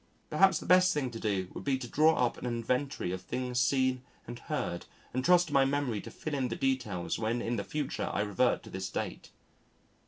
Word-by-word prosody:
Perhaps 190 -3 +5
the - - -7
best 185 0 +5
thing 135 -4 -1
to 115 - -7
do 95 -4 -1
would - - -7
be 135 -2 +1
to 130 -2 -6
draw 155 +6 +4
up 120 - -2
an - - -4
inventory 125 -2 -1
of 95 0 -4
things 125 +4 -2
seen 130 0 +2 0.2
and 120 +1 -8
heard 120 - -3 0.3
and 130 +1 -1
trust 175 0 +5
to - - -6
my 135 -1 +6
memory 135 -5 0
to - - -9
fill 155 - -6
in 135 -3 0
the 115 - -3
details 120 -10 -1
when 115 +2 0
in 120 0 -1
the 100 - -2
future 145 +4 -3
I - - 0
revert 105 +4 +1
to - - -12
this 95 0 -4
date. - - -5
125 Hz, 220 wpm, -31 LUFS, 115-145 Hz, 0.3 s, my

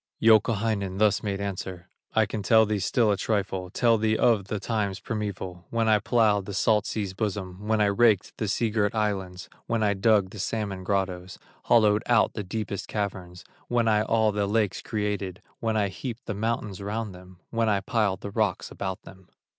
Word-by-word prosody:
Youkahainen 110 -3 +3
thus 105 -1 +3
made 100 -2 -3
answer: 95 -2 -5 0.3
"I 110 -1 +4
can 105 +1 -4
tell 110 +2 +5
thee 105 -1 -1
still 115 +2 +2
a 100 - +1
trifle, 95 -3 -2
Tell 115 +3 +2
thee 110 0 +1
of 110 -5 +3
the 105 0 -3
times 100 -2 -2
primeval, 95 -5 -5
When 115 -1 0
I 110 -1 +5
plowed 105 -3 +2
the 100 - -5
salt 105 0 +2
sea's 100 -4 -3
bosom, 100 -1 -4
When 110 0 +2
I 105 - +4
raked 105 -1 +3
the 110 - -2
sea 110 +3 0
girt 105 -1 0
islands, 95 -4 -2 0.2
When 115 -1 0
I 105 -1 +3
dug 100 -1 +2
the 105 - -9
salmon 100 -2 -3
grottoes, 95 -1 -2 0.3
Hollowed 105 -2 +4
out 120 -3 +3
the 105 - -4
deepest 100 +1 -4
caverns, 90 -4 -4 0.2
When 120 -1 +1
I 105 -1 +4
all 110 0 +2
the 100 -1 -1
lakes 105 -1 0
created, 105 -4 -3 0.2
When 110 -1 0
I 100 -2 +1
heaped 120 +4 -7
the 105 - -3
mountains 105 -2 -2
round 105 0 -3
them, 90 0 -14
When 115 -1 +1
I 100 -2 +2
piled 100 -3 0
the 100 - -6
rocks 105 -3 -1
about 95 -1 -5
them. 95 -1 -15
105 Hz, 190 wpm, -26 LUFS, 95-110 Hz, 0.3 s, tell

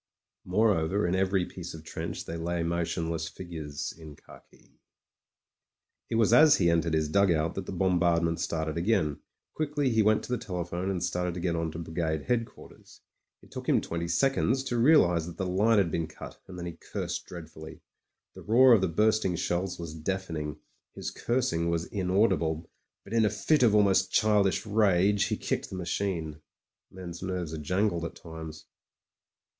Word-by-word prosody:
Moreover, 100 -1 +2
in 85 - 0
every 95 -1 +1
piece 90 -2 -8
of 80 - -10
trench - - -5
there 85 +1 -5
lay 85 0 -2
motion 85 -1 -1
less 80 -1 -3
figures 80 -5 -6
in 80 -2 -11
khaki.. - - -18
•. - - -32 1.4
It - - -1
was 115 0 +3
as 155 +3 +7
he 85 -3 +3
entered 85 -1 +1
his 80 -1 +1
dugout 85 -2 +2
that 95 -1 -6
the - - -4
bombard 90 -2 +2
ment 85 0 0
started 80 0 -2
again. 85 -6 +1 0.3
Quickly 145 -3 -1
he 110 -1 +3
went 110 0 +3
to - - -8
the 125 - 0
telephone, 90 0 -3
and 90 -3 -2
started 90 -1 -1
to - - -4
get 85 -1 -1
on 80 -1 -2
to - - -6
brigade 80 -2 -2
headquarters. 115 -2 -5 0.4
It - - -19
took - - -6
him - - +4
twenty 85 0 -4
seconds 130 +7 +1
to 120 -3 -2
realise 90 - +4
that 85 - -9
the 95 - -2
line 105 +5 +3
had 95 -5 +2
been 80 -1 -1
cut, 80 - -11
and 90 - -9
then 90 - -5
he 85 -1 -7
cursed - - -5
dreadfully. 80 -2 -10 0.5
The - - -11
roar 125 +3 +6
of 110 - +5
the 95 - +2
bursting 105 +1 +2
shells 90 +1 -2
was 85 -2 -7
deafening; 80 -3 -4 0.4
his - - -5
cursing 115 -10 -1
was 85 0 -1
inaudi 95 +2 +2
ble; 80 0 -3 0.4
but 100 - -10
in 115 -1 +4
a 105 - +3
fit 105 +9 +1
of 115 -4 +5
almost 100 -2 +3
childish 105 -2 +2
rage 100 -2 +3
— - - -6
^he - - -2
kicked - - -2
the - - -7
machine. 85 -4 -3 0.5
Men's 90 -2 -9
nerves 90 -4 -3
are 80 - -4
jangled 90 +3 0
at 85 - -5
times. 80 -2 -9
90 Hz, 185 wpm, -28 LUFS, 85-105 Hz, 1.4 s, as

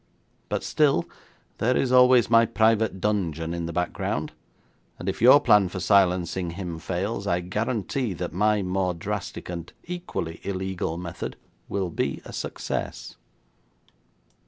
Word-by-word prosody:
But - - -2
still, 145 - +2 0.5
there 125 +3 +2
is 130 - +1
always 125 -1 +6
my 115 0 +5
private 110 -3 +2
dungeon 85 -6 -1
in 85 -1 -3
the - - -4
background, 90 +2 -2 0.7
and 90 - -8
if 95 - -2
your 130 +5 +8
plan 105 -9 +4
for 95 - -5
silencing 90 -2 +2
him 90 -4 -5
fails, 100 +4 -3
I 90 -3 +2
guarantee 110 +5 -2
that 90 0 -5
my 105 +2 +2
more 90 -1 0
drastic 85 - -5
and 85 -1 -6
equally 170 - -5
illegal 95 -3 -3
method 85 -1 -6 0.3
will 95 -3 -2
be - - -2
a - - -9
success.' - - -4
95 Hz, 135 wpm, -25 LUFS, 90-110 Hz, 0.7 s, your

